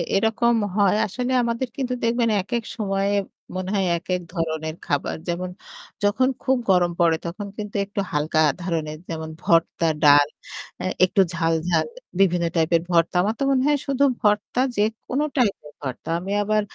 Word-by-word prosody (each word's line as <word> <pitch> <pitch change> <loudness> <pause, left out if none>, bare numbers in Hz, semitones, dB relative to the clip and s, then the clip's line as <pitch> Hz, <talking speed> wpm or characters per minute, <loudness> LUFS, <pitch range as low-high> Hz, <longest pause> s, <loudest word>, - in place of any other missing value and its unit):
এরকম 225 +3 +2 0.2
হয় 200 -1 +4
আসলে 250 +5 -3
আমাদের 235 +2 -1
কিন্তু 255 -2 -1
দেখবেন 230 0 +2
একেক 235 +3 -2
সময়ে 195 -2 0 0.4
মনে 185 0 -3
হয় 195 -1 +1
একেক 180 +1 -2
ধরনের 160 -2 -2
খাবার 145 -1 -1
যেমন 180 +1 -2 0.5
যখন 215 +6 +3 0.2
খুব 265 -1 +2
গরম 180 -2 +4
পড়ে 165 -2 +4
তখন 200 +5 -5
কিন্তু 210 -1 -6
একটু 200 0 -3
হালকা 155 +1 +1 0.2
ধরনের 160 -3 -2
যেমন 160 -1 -4
ভর্তা, 165 0 +2 0.2
ডাল 145 -1 +7 0.8
একটু 190 +2 +2
ঝাল-ঝাল 165 - +1 0.3
বিভিন্ন 180 -3 +3
টাইপের 165 0 +3
ভর্তা। 170 +1 +2
আমার 215 +3 0
তো - - 0
মনে 260 -1 +2
হয় 295 -1 +3
শুধু 275 0 +1 0.2
ভর্তা 210 +4 +1 0.2
যেকোনো 225 +6 0
টাইপের 200 - 0
ভর্তা। 130 0 -6
আমি 190 +3 -6
আবার 215 +1 +2
195 Hz, 150 wpm, -23 LUFS, 165-225 Hz, 0.8 s, ডাল